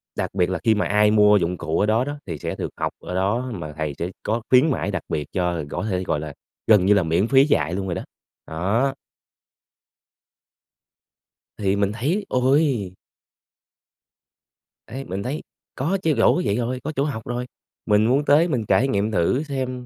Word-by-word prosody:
đặc - - -3
biệt 90 -2 +1
là 95 -2 -2
khi 110 - +4
mà 105 - 0
ai 105 +1 +3
mua 105 -1 +5
dụng 90 0 -1
cụ 80 -1 -2
ở - - +3
đó 110 +4 +2
đó 145 +1 -5
thì 80 -5 -5
sẽ - - -4
được - - -4
học - - -1
ở 90 - -6
đó, 115 +7 0
mà 75 -6 -6
thầy 80 -2 -2
sẽ 85 +2 -3
có 110 +3 -1
khuyến 130 +5 +5
mãi - - -2
đặc - - -3
biệt 75 -2 -2
cho 90 -3 -1
có - - -3
thể, 95 -1 -1
gọi 75 - -1
là, 75 -1 -6 0.3
gần 105 -5 +5
như 100 - +5
là, 100 -3 +3
miễn 85 +6 +1
phí 135 +2 +5
dạy 85 - +1
luôn 95 +1 -2
rồi 85 - -2
đó. - - -3 0.5
Đó. 105 +12 0 2.6
Thì 100 -1 0
mình 100 0 +1
thấy, 155 - -1
ôi! 130 - +1 1.9
Ấy, 130 +4 -6
mình 95 +2 -4
thấy 135 +5 -3 0.3
có 165 +9 0
chứ 160 - +3
rỗ - - +4
cái 180 - -1
vậy 100 - +1
rồi, 125 +1 -2
có 155 - -3
chỗ 135 - +1
học 140 -6 -3
rồi. 120 +1 -3 0.4
Mình 105 0 +3
muốn 135 +5 +2
tới 150 +4 +5
mình 125 -10 -1
trải 115 +8 +3
nghiệm 105 -2 0
thử 110 - +1
xem 130 -4 -4
105 Hz, 200 wpm, -22 LUFS, 95-130 Hz, 2.6 s, mua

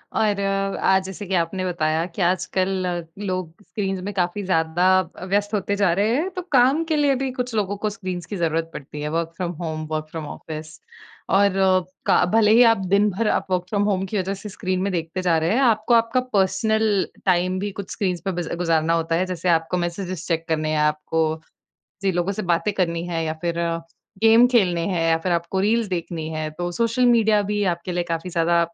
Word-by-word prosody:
और 210 -2 +1
आज 195 -1 +1
जैसे 190 +2 -7
कि 190 - -3
आपने 180 +2 -1
बताया 160 -2 0
कि 180 +2 -7
आजकल 185 +1 0
अ, 175 -1 -2 0.2
लोग 185 -4 -3
स्क्रीन्स 195 -4 -3
में 205 +2 -5
काफ़ी 180 +2 -1
ज़्यादा 170 -1 +1
अ, 185 0 -6
व्यस्त 205 +2 0
होते 200 -1 0
जा 200 -3 +2
रहे 210 +6 +1
हैं 325 +7 0
तो 365 - -2
काम 270 +4 +4
के - - +3
लिए 290 -2 +3
भी 265 -1 -1
कुछ 250 -1 -4
लोगों 205 -1 -1
को 215 +1 -1
स्क्रीन्स 185 -5 -5
की 205 - -6
ज़रूरत 165 -1 0
पड़ती 150 +1 -8
है 150 - -2
work 165 0 -2
from 180 -2 -2
home 155 -2 -3
work 155 0 -2
from 160 -2 -5
office. 155 +1 -8 0.5
और 200 0 +3
अ, 190 -1 +4 0.3
का - - +4
भले 215 -2 +5
ही 235 +3 +7
आप - - -5 0.2
दिन 205 +1 +4
भर 215 +4 -1
आप - - 0
वर्क 180 -1 +1
फ्रॉम 205 0 +1
होम 195 -2 0
की 210 +2 -3
वजह 190 0 -1
से 210 - -6
स्क्रीन 185 -2 -2
में 200 +1 0
देखते 165 +2 -3
जा 175 -3 +2
रहे 160 +1 0
हैं 260 - +2
आपको 225 -2 +3
आपका 230 +2 +3
पर्सनल 205 +1 +2 0.2
टाइम 185 0 +2
भी 205 +1 -3
कुछ 190 - -12
स्क्रीन्स 180 -4 -2
पे 195 - 0
बिज़ 175 -2 -4
गुज़ारना 165 -2 +1
होता 165 0 0
है। 180 +3 +1
जैसे 180 -1 -2
आपको 165 +2 +1
मेसेजेस 175 0 -4
चेक 165 -1 -1
करने 155 -1 0
हैं, 155 - 0
आपको 155 +1 0 0.6
जिन 195 -1 +1
लोगों 175 +2 0
से 200 - -4
बातें 200 +5 0
करनी 170 -3 -1
हैं 165 -2 -2
या 155 - -1
फिर 170 -1 -1
अ, 170 -1 0 0.4
गेम 225 +2 +7
खेलने 190 -9 +2
हैं 180 -4 -1
या 165 - +4
फिर 175 +3 -2
आपको 170 +2 -1
रील्स 220 +3 +2
देखनी 170 -3 -4
हैं। 155 -1 -3
तो 175 0 -2
सोशल 230 +5 +1
मीडिया 220 -3 +4
भी 205 +1 -1
आपके 170 +1 -5
लिए 175 0 -1
काफ़ी 165 +2 -2
ज़्यादा 170 0 +2
185 Hz, 220 wpm, -22 LUFS, 170-205 Hz, 0.6 s, ही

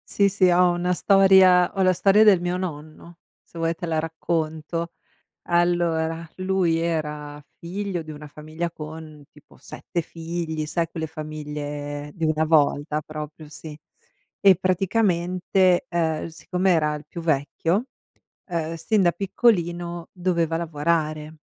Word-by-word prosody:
Sì, 200 - +4
sì, 195 -2 +3
ho 180 0 +4
una 175 +1 -1
storia 190 -1 +5
ho 195 - -1
la 185 0 +4
storia 200 +4 +4
del 195 -5 +6
mio 175 +1 -1
nonno. 165 -1 -7 0.2
Se - - -16
vuoi 165 0 0
te 175 - -6
la 165 -1 -1
racconto. 160 +1 -3 0.6
Allora, 170 -1 +1
lui 185 -3 +1
era 150 -3 -3 0.2
figlio 185 +1 -4
di 155 - -11
una 150 -1 -8
famiglia 155 +3 -5
con 155 -1 -9
tipo 150 - -20
7 170 - -5
figli, 165 -1 -5
sai 165 +2 -1
quelle 160 -1 -4
famiglie 150 -1 -6
di 165 -3 -2
una 155 0 +1
volta 150 -1 +2
proprio 155 0 -8
sì. 150 0 -10 0.6
E 195 -2 +6
praticamente, 185 -1 +1
uhm, 160 -2 0
siccome 180 +3 -1
era 150 -3 +2
il 150 0 -9
più 170 - -7
vecchio, 165 - 0 0.6
uhm, 165 -3 -3
sin 195 +5 +1
da 175 - +4
piccolino 175 -4 0
doveva 170 -3 0
lavorare. 155 -1 -1
165 Hz, 135 wpm, -24 LUFS, 155-180 Hz, 0.6 s, del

